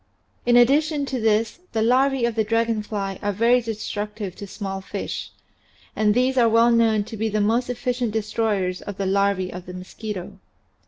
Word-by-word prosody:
In 240 0 +6
addition 290 +4 +3
to 265 -2 -3
this 220 +4 +1
the 220 -1 +1
larvae 260 +1 +3
of 235 - 0
the 220 0 +1
dragon 230 0 0
fly 200 -3 -4
are 205 - 0
very 235 +5 +3
destructive 210 -3 -5
to 200 - -7
small 195 -1 -5
fish, - - -5 0.7
and 210 -1 +2
these 255 +2 +2
are 230 -1 +5
well 230 +1 +5
known 225 -2 +3
to 220 - -8
be 220 +1 -1
the 215 0 -1
most 230 +4 +1
efficient 245 0 -1
destroyers 210 -4 -1
of 205 -1 -7
the 195 - -2
larvae 195 -1 +1
of 180 0 -8
the 180 - -7
mosquito. 185 +1 -7
220 Hz, 180 wpm, -23 LUFS, 200-235 Hz, 0.7 s, In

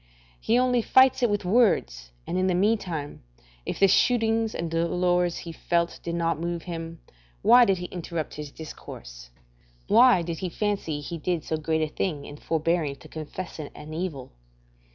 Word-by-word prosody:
He 230 - +2
only 250 -1 +3
fights 260 +2 +5
it 240 - +3
with 205 -2 -1
words, 180 - +2 0.2
and - - -4
in 185 0 +1
the 185 - +2
meantime, 180 -7 -1 0.5
if - - -3
the 195 - +6
shootings 225 +1 +2
and 170 -1 -3
dolours 175 +1 +1
he 170 - -7
felt 170 +1 -1
did 170 - -4
not 165 -2 0
move 170 -1 -3
him, 165 -1 -6 0.4
why 245 0 +7
did 195 -3 +2
he 180 - -5
interrupt 170 -3 -5
his 150 -1 -7
discourse? - - -10 0.6
Why 230 -4 +6
did 165 -1 -4
he 185 - -3
fancy 185 -6 -2
he 165 +3 -6
did 170 -1 -1
so 160 - -2
great 160 0 0
a - - 0
thing 155 -7 -2
in 145 - -9
forbearing 160 -2 0
to - - -15
confess 160 +3 -7
it 150 - -6
an 150 +1 -9
evil? 160 -6 -4
170 Hz, 175 wpm, -26 LUFS, 155-195 Hz, 0.6 s, why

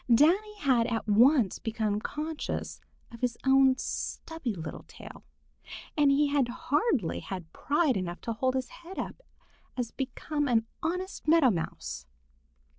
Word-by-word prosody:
Danny 360 - +4
had 255 - +2
at 225 -2 -2
once 230 - +4
become 220 -2 -1
conscious 305 +4 -4 0.3
of 235 - -11
his 245 -2 0
own 265 -1 +5
stubby 300 -7 -4
little 160 -2 -6
tail, - - -12 0.7
and 295 -2 +4
he 285 +1 +3
had 280 -3 +2
hardly 255 - 0
had 180 -4 -7
pride 295 -2 +1
enough 180 -2 -3
to 230 - -3
hold 255 +3 0
his 260 -1 -2
head 350 +3 -11
up - - -5 0.6
as 240 -2 -2
became 285 +3 -2
an 225 -3 +2 0.2
honest 365 +1 -3
Meadow 310 -5 +6
Mouse. - - -4
260 Hz, 140 wpm, -29 LUFS, 225-300 Hz, 0.7 s, Meadow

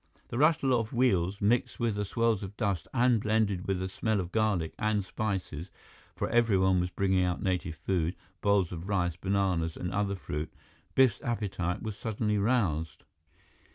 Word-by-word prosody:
The 120 - -3
rattle 150 -3 +4
of 115 0 0
wheels 100 -6 +2
mixed 115 +4 +1
with 110 -3 0
swirls 115 -1 +1
of 100 0 -7
dust 100 -7 -1
and 125 -3 +3
blended 105 -4 +1
with 95 -1 +1
the 95 - -2
smell 110 +2 -1
of 90 -1 -4
garlic 105 -7 +1
and 105 -2 +1
spices, 95 -6 -3 0.5
for - - -1
everyone 95 -6 +3
was 90 0 0
bringing 95 0 +1
out 90 -1 -1
native 90 -3 -1
food, 85 -1 -1 0.3
bowls 100 -4 +2
of 90 +2 -6
rice, 90 -4 +1
bananas, 90 -3 0
and 90 - -3
other 100 0 0
fruit. 75 -4 -5 0.4
Biff's 130 -3 +4
appetite 95 -7 -2
was 110 -2 -4
suddenly 105 -1 -1
roused. 90 -9 0
100 Hz, 160 wpm, -30 LUFS, 90-110 Hz, 0.5 s, rattle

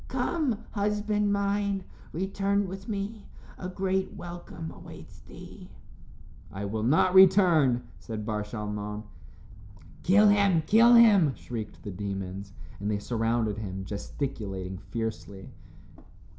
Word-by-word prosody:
Come, 250 -10 -1
husband 210 0 0
mine, 200 -1 0 0.3
return 195 +3 0
with 195 +3 -8
me; 205 +1 -4 0.3
a 180 - -5
great 190 0 -1
welcome 175 -2 -8
awaits - - -12
thee." - - -13 0.8
"I 100 +1 -5
will 105 +2 -3
not 155 +10 +3
return," 175 -10 +6 0.2
said 110 -3 -6
Bar 105 -1 -2
Shalmon. 105 0 -5 1.0
"Kill 205 +3 +5
him, 200 -5 +3
kill 230 +5 +6
him," 200 - +6
shrieked 115 -3 -7
the 100 - -5
demons, 95 0 -5 0.3
and 100 +2 -3
they 105 - 0
surrounded 115 -1 -1
him, 95 -2 -5
gesticulating 100 -4 -5
fiercely. 105 -3 -6
160 Hz, 115 wpm, -28 LUFS, -, 1.0 s, return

